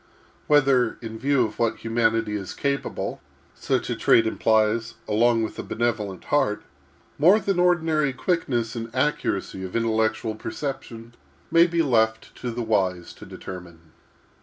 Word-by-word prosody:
Whether, 135 -5 +3
in 110 0 -6
view 135 -1 +2
of 105 - -8
what 115 -1 0
humanity 115 -1 +1
is 95 -3 -5
capable, 140 0 -3 0.3
such - - -1
a - - -2
trait 115 - +4
implies, 110 +1 +1
along 115 +2 +3
with 110 - -5
a - - -1
benevolent 110 -5 -2
heart, 105 -8 0 0.6
more 180 +9 +6
than 195 -2 -1
ordinary 160 -5 +2
quickness 130 - -1
and 115 0 -5
accuracy 130 -8 -1
of 95 - -7
intellectual 110 -1 0
perception, 120 0 -6 0.4
may 170 +1 +6
be 170 -1 +1
left 110 -5 +1
to 125 - -4
the 120 +1 -3
wise 95 -5 0
to - - -13
determine. 85 -3 -10
115 Hz, 140 wpm, -24 LUFS, 110-140 Hz, 0.6 s, more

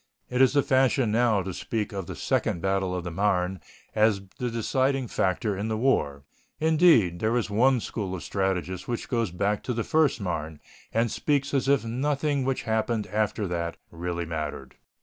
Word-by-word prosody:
It 125 +1 +2
is 130 - +5
the 140 -1 +3
fashion 130 -3 +2
now 110 -3 +3
to 95 0 -5
speak 110 +3 -3
of 95 -3 -4
the - - -6
second - - 0
battle 95 0 0
of 90 - -3
the 85 - -5
Marne 90 -1 0 0.3
as 110 -2 +3 0.2
the 125 - -1
deciding 130 +3 0
factor 100 +1 0
in 100 +3 -3
the 110 -1 -1
war. 70 - +1 0.4
Indeed, 155 - +4
there 110 +4 +1
is 110 -3 -2
one 125 +5 +4
school 100 -4 -4
of 90 - -7
strategists 95 -2 -2
which 120 - -3
goes 115 -4 0
back 100 +4 -1
to 125 - -3
the 115 - -1
first 155 -3 +2
Marne, 80 -5 -4 0.3
and 115 0 +1
speaks 140 -1 0
as 135 -1 +1
if 140 -3 +3
nothing 140 +4 0
which 135 -1 -1
happened 110 -1 0
after 105 0 -1
that 85 -1 -3
really 85 0 -3
mattered. 75 -5 -5
110 Hz, 185 wpm, -26 LUFS, 90-125 Hz, 0.4 s, is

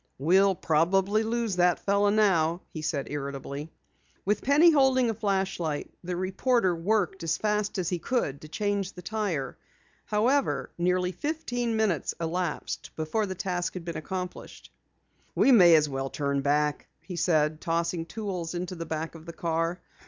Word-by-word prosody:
"We'll 190 +7 +4
probably 190 +7 +2
lose 225 -3 -1
that 175 -1 +4
fellow 200 +1 +2
now," 180 -5 +2
he 155 - -5
said 150 -3 -2
irritably. 140 +1 -5 0.6
With 210 +2 +1
Penny 300 +6 +6
holding 260 -5 +4
a - - -3
flashlight, 190 -7 -2
the 180 0 -3
reporter 190 +2 +1
worked 190 +2 0
as 165 -1 0
fast 210 -1 -1
as 180 -2 -1
he 180 - -2
could 160 - -1
to 155 - -10
change 200 +3 -2
the 180 - -11
tire. 190 -9 -2 0.5
However, 250 +7 +1
nearly 180 +1 +1
fifteen 245 - -2
minutes 215 -8 0
elapsed 170 0 -3
before 160 +7 -1
the 190 - -4
task 180 -1 -2
had 180 -2 -6
been 170 - -5
accomplished. 180 +2 -6 0.6
"We 275 - +5
may 180 -8 +8
as 150 -1 +4
well 135 -1 -3
turn 140 -2 -1
back," 150 +1 0 0.2
he 180 - -7
said, 155 -2 +1
tossing 165 0 -1
tools 185 -6 -4
into 180 +1 -3
the 165 -2 -6
back 160 0 -3
of 165 0 -13
the 170 - -6
car. 165 +1 -1
180 Hz, 160 wpm, -27 LUFS, 160-210 Hz, 0.6 s, may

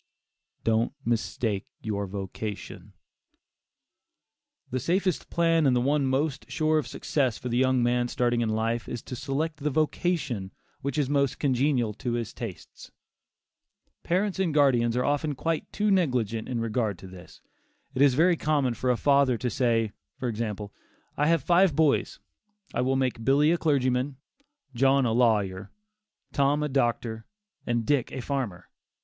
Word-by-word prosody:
DON'T 115 +2 +1
MISTAKE 110 -3 -1 0.2
YOUR 100 -2 -2
VOCATION. 100 +2 -6 1.8
The 130 - -1
safest 180 +6 0
plan, 165 -2 +3
and 130 - +3
the - - +3
one 140 +2 +1
most 135 +1 -1
sure 155 +2 +2
of - - -4
success 130 -6 -1
for 125 - -5
the 120 - 0
young 130 -1 +3
man 120 0 +2
starting 120 -1 0
in 115 - 0
life, 115 +2 -1
is 120 - -5
to 125 - -7
select 145 +5 -2
the 150 0 -1
vocation 145 - -1 0.3
which 140 0 -3
is 145 -3 +1
most 140 -2 +1
congenial 130 -4 +1
to 120 +3 -4
his 120 -2 -3
tastes. 115 -7 -9 1.1
Parents 190 +2 0
and 170 -6 0
guardians 125 -5 +3
are 125 - +1
often 145 +1 0
quite 165 +4 -2
too 210 0 +1
negligent 125 - 0
in 120 -2 -2
regard 110 -3 -1
to 95 - -12
this. 95 -1 -13 0.5
It 130 - -1
is 140 -3 +5
very 170 +4 +4
common 145 -6 +1
for 125 +2 -2
a 125 - +3
father 140 -3 +3
to 125 +1 -2
say, 115 -4 +1 0.3
for 125 - -3
example: 105 -3 -4 0.4
"I 150 - +1
have 165 -4 +2
five 175 -1 +4
boys. 155 -2 +2 0.5
I - - 0
will 130 +1 +1
make 130 -3 -1
Billy 145 +5 +4
a 170 - +2
clergyman; 130 -2 +1 0.6
John 135 +2 +3
a 115 - +1
lawyer; 105 -5 +1 0.6
Tom 145 +2 +2
a 150 - -1
doctor, 120 -4 -1 0.4
and 120 -1 0
Dick 140 0 +1
a 130 - -5
farmer." 120 -11 -3
130 Hz, 155 wpm, -27 LUFS, 115-145 Hz, 1.8 s, is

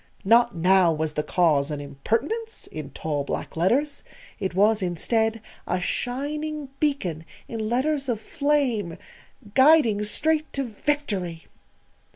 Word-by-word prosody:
Not 235 +2 +4
now 180 +1 +4
was 155 -1 -2
the 150 - 0
Cause 150 -4 +2
an 150 -1 -3
IMPERTINENCE 230 - -3
in 155 -3 -6
tall 145 0 -3
black - - -5
letters. 265 - +1 0.4
It 190 -2 -3
was, 210 +2 +4
instead, 220 +6 0 0.3
a 180 - 0
shining 290 +8 -3
beacon 190 - -1 0.2
in 220 -2 -4
letters 275 +3 0
of 230 -3 0
flame 250 - 0 0.6
guiding 260 -6 +5
straight 310 +8 +1
to 275 - -1
victory. 210 - -2
220 Hz, 125 wpm, -25 LUFS, 175-285 Hz, 0.6 s, guiding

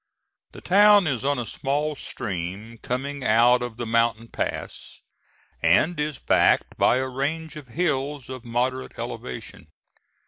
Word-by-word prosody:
The - - -11
town 205 +1 +6
is 135 -6 -1
on 140 0 +1
a 120 - -3
small 145 +6 -2
stream 100 0 -6
coming 135 +2 -4
out 120 +2 +4
of 120 -2 -5
the 120 - -4
mountain 115 0 +1
pass, - - -5 0.6
and 145 - +3
is 150 -2 -2
backed - - +2
by 125 - +3
a 130 0 -1
range 155 +5 -3
of 150 -4 -10
hills 145 -2 -2
of 130 -2 -7
moderate 125 +2 -2
elevation. 65 +4 -7
130 Hz, 140 wpm, -24 LUFS, 115-150 Hz, 0.6 s, town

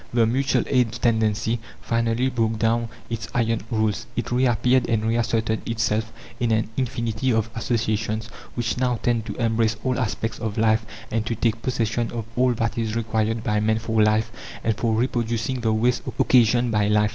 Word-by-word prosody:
The 115 -1 +3
mutual 135 +5 +1
aid 125 -4 +2
tendency 110 0 +1 0.2
finally 115 +2 0
broke 115 -2 0
down 115 +1 +1 0.2
its 115 -1 -4
iron 115 -1 +1
rules; 110 -1 0
it 120 - -3
reappeared 125 0 +2
and 110 -2 +1
reasserted 115 -1 0
itself 110 -1 0 0.3
in 120 - +1
an 110 0 +1
infinity 120 -1 -1
of 110 -1 0
associations 110 -2 -1 0.3
which 120 0 -1
now 125 -1 +2
tend 115 -2 +1
to 105 - -4
embrace 115 -1 +1
all 130 -1 0
aspects 115 -1 -2
of 110 -1 -3
life 110 0 +2 0.2
and 110 -1 0
to 115 - -1
take 115 0 0
possession 115 -2 -1
of 115 -2 -4
all 125 0 +3
that 115 +1 -1
is 110 -1 -2
required 110 0 0
by 105 0 +1
man 110 +1 +2
for 110 -1 0
life 110 +1 +2 0.3
and 110 -1 +1
for 110 0 0
reproducing 120 +1 -1
the 110 -1 +1
waste 120 +3 +2 0.2
occasioned 120 -1 +4
by 105 -2 +2
life. 105 0 +3
115 Hz, 175 wpm, -24 LUFS, 110-120 Hz, 0.3 s, occasioned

